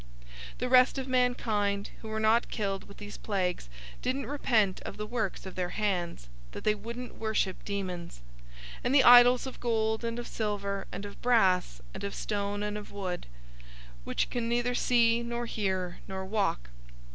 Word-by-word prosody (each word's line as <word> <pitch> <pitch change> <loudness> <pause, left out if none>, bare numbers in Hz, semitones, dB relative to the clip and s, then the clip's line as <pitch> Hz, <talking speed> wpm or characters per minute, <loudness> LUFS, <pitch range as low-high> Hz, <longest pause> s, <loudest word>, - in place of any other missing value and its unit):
009:020 - - -20
The 250 - -2
rest 255 +1 +6
of 265 -1 -3
mankind, 220 -6 +1
who 220 - -8
were 220 0 -2
not 220 +2 +3
killed 195 -3 -2
with 200 - -14
these 205 0 -9
plagues, 180 - -2 0.3
didn't 265 +2 -1
repent 225 -9 +1
of - - -7
the 210 - -3
works 220 -4 -3
of 190 - -7
their 180 -1 -2
hands, 180 - -2 0.3
that - - -7
they 215 - +4
wouldn't 235 +4 -7
worship 220 -4 -1
demons, 180 - -5 0.6
and 250 +3 +2
the 270 - +7
idols 245 0 +8
of 265 - -7
gold, 220 -1 0
and 230 0 -2
of 240 - -4
silver, 200 -2 -3
and 200 - -5
of 200 - -10
brass, 185 - +3
and - - -7
of 200 - -3
stone, 205 0 -2
and 210 0 -2
of 210 - -11
wood; 185 -3 -4 0.8
which - - -1
can 235 -1 -1
neither 240 +1 +1
see, 235 -1 +3
nor 235 0 -3
hear, 190 -5 -2
nor 190 0 -4
walk. 190 - -1
210 Hz, 175 wpm, -30 LUFS, 195-240 Hz, 0.8 s, idols